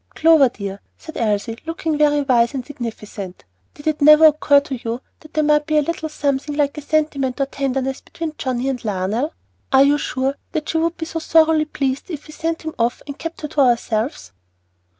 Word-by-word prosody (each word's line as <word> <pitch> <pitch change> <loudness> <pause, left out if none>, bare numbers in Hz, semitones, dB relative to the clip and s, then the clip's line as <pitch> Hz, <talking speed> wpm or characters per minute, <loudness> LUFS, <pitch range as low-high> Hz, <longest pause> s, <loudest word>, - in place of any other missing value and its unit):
"Clover 315 -4 +5
dear," 200 -3 -6 0.2
said 315 - -11
Elsie, 225 +1 -1
looking 330 -2 -2
very 295 -1 +3
wise 240 -1 +2
and 255 -2 -4
significant, 215 -8 -7 0.3
"did 290 - -13
it 310 -1 0
never 305 +2 +8
occur 295 -2 +5
to 280 -4 -6
you 230 +1 -3 0.2
that 310 -1 -17
there 310 - +2
might 300 0 +3
be 310 -1 +2
a 300 - +4
little 320 0 -3
something 285 -1 -2
like 290 -1 +1
a 300 - -6
sentiment 290 -3 0
or 275 - +2
tenderness 270 -1 -2
between 330 -2 -6
John 255 -2 -2
and 270 -2 -2
Lionel? 210 - -2 0.4
Are 270 0 +7
you 290 +1 +3
sure 265 +1 -2 0.2
that 310 -1 -3
she 320 - +1
would 335 +1 0
be 320 - -4
so 325 0 -4
thoroughly 320 -1 +4
pleased 275 0 -3
if 305 -4 -6
we 305 - -11
sent 330 +1 -3
him 315 0 -5
off 235 +1 0
and 285 0 -8
kept 330 0 -6
her 300 - -3
to 290 - +1
ourselves?" 240 - 0
285 Hz, 205 wpm, -20 LUFS, 255-310 Hz, 0.4 s, never